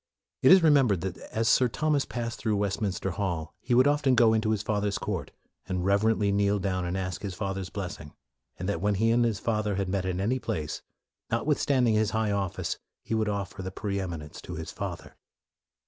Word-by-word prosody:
It - - +7
is 185 -2 +8
remembered 135 - +4
that 95 -1 -3
as 115 0 -3
Sir 125 +3 +5
Thomas 150 +3 0
passed 115 -1 -4
through 105 -1 0
Westmin 100 0 0
ster 95 +1 -3
Hall, 85 -4 -3
he 125 -1 0
would 130 +2 +6
often 145 -2 +3
go 115 -2 +5
into 110 0 +1
his 110 -1 0
fa 105 -2 0
ther's 100 -1 0
court, - - -3 0.4
and 90 -1 -2
reverently 100 +1 +3
kneel 100 0 +2
down 95 -2 -1
and 90 +2 -2
ask 95 +1 -3
his 100 -3 -4
father's 95 -2 -3
blessing; 90 -7 -6 0.4
and 90 - -4
that 100 - -1
when 105 0 +2
he 115 +3 +2
and 120 +1 +4
his 115 -3 +1
father 105 -3 0
met 95 0 -1
in 90 -1 -1
any 120 +7 0
place, 80 -12 -3 0.2
" - - -63
notwithstanding 125 -1 +2
his 110 -1 +2
high 110 -2 +1
office, 100 -3 -2 0.2
he - - -4
would 110 -1 +1
offer 100 -1 -3
the 95 - -4
pre 100 +1 -3
eminence 85 -6 -6
to - - -7
his - - -6
father." - - -6
105 Hz, 210 wpm, -28 LUFS, 95-115 Hz, 0.4 s, is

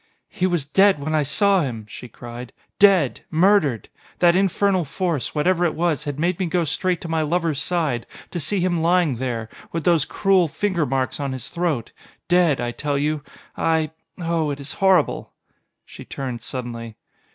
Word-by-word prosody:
"He 185 - 0
was 175 -6 -1
dead 195 +6 +4
when 155 +2 -3
I 155 - +3
saw 195 +6 +3
him!" 115 -7 -4
she 125 - -9
cried. 120 +1 -9 0.3
"Dead! 190 -10 +4
Murdered! 160 - +3 0.3
That 175 -1 +4
infernal 195 0 +2
force, 160 - -2
what 150 - 0
ever 180 -1 +3
it 170 - +1
was, 160 -2 0
had 145 -1 -4
made 175 +3 0
me 185 - 0
go 175 +1 +1
straight 180 +3 -1
to - - -6
my 160 -1 0
lover's 160 -2 0
side, 150 -9 -1 0.2
to 175 - -3
see 190 +5 0
him 175 -2 +1
lying 170 -5 +2
there, 115 -3 -3 0.2
with 165 -1 -3
those 170 -5 +3
cruel 190 -1 +2
finger 170 +1 -1
marks 130 +1 -1
on 140 -2 -2
his 130 -3 -5
throat 170 -9 -2 0.4
dead, 175 -5 +3
I 120 0 -2
tell 145 +3 -2
you, 150 +1 0 0.3
I 160 -1 +1 0.3
oh, 165 -3 -1
it 145 0 -4
is 140 0 -4
horrible!" 190 -5 +2 0.5
She - - -11
turned 125 -4 -5
suddenly. 115 -3 -6
160 Hz, 180 wpm, -22 LUFS, 135-180 Hz, 0.5 s, dead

